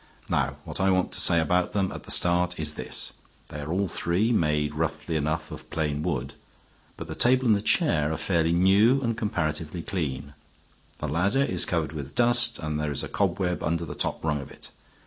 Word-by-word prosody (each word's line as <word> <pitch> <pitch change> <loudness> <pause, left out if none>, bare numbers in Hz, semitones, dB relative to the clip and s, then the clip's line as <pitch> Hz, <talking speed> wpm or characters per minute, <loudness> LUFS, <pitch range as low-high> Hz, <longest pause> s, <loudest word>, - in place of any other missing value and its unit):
Now - - +1
what - - -7
I 95 - +3
want 95 -1 +1
to - - +1
say 85 - +6
about 90 +3 +1
them 95 -2 0
at - - -8
the - - -13
start 90 0 +1
is 75 -1 -1
this. - - -2 0.4
They 75 - -7
are 75 +2 -5
all 95 +2 0
three 90 +7 0
made 75 -7 +1
roughly 80 +1 -2
enough 80 +1 -2
of - - -9
plain 75 -2 -2
wood. 70 -6 -2 0.6
But 85 - -6
the 80 - -5
table 130 +7 +3
and 110 -3 +5
the 100 - -1
chair 80 - +3
are 80 - -2
fairly 80 +1 +1
new 100 +9 +4
and 115 -2 0
comparatively 85 -5 -2
clean. 70 -6 -4 0.6
The 75 - -4
ladder 95 - +1
is 90 -10 +1
covered 80 -5 -1
with 70 -2 -7
dust 120 0 +3
and 75 -2 -3
there 75 -1 -1
is 70 - -1
a - - -4
cobweb 90 -2 -1
under 85 +2 -1
the - - -6
top - - -3
rung 75 -2 0
of 70 - -11
it. - - -11
85 Hz, 205 wpm, -26 LUFS, 75-95 Hz, 0.6 s, say